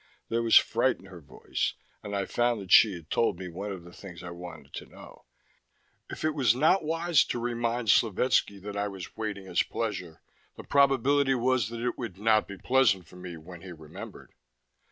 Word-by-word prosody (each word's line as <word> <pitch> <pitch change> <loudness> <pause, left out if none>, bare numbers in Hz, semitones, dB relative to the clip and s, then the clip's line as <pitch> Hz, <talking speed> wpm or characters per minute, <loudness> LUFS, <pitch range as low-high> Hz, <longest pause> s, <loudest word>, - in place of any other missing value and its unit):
There 115 +1 0
was 115 -1 +6
fright 120 +3 +2
in 95 - -17
her 95 -3 -12
voice; 70 - -3 0.3
and 100 0 -5
I 100 -1 -1
found 120 +1 0
that 95 -2 -9
she 105 -4 +7
had 85 -2 -12
told 115 - +1
me 90 -1 -7
one 100 +4 -6
of 95 -3 -7
the 90 0 -14
things 90 -3 -11
I 85 - -7
wanted 85 -5 -10
to - - -7
know. - - -15 0.8
If - - -5
it 155 - +2
was 125 -6 +3
not 160 +7 +3
wise 165 +1 +2
to - - -3
remind 120 -1 -2
Slovetski 110 -1 +2
that 105 0 -6
I 100 0 -1
was 95 -3 -8
waiting 105 -3 -4
his 90 -2 +1
pleasure, 90 -8 -4 0.4
the - - -10
probability 140 0 +3
was 125 -3 +1
that 115 0 -6
it 125 - -2
would 115 -7 -6
not 110 +1 +2
be 100 - -8
pleasant 120 -7 +2
for 90 - -15
me 90 -2 -8
when 85 +2 -12
he 95 - -9
remembered. 80 -3 -11
105 Hz, 200 wpm, -28 LUFS, 90-120 Hz, 0.8 s, she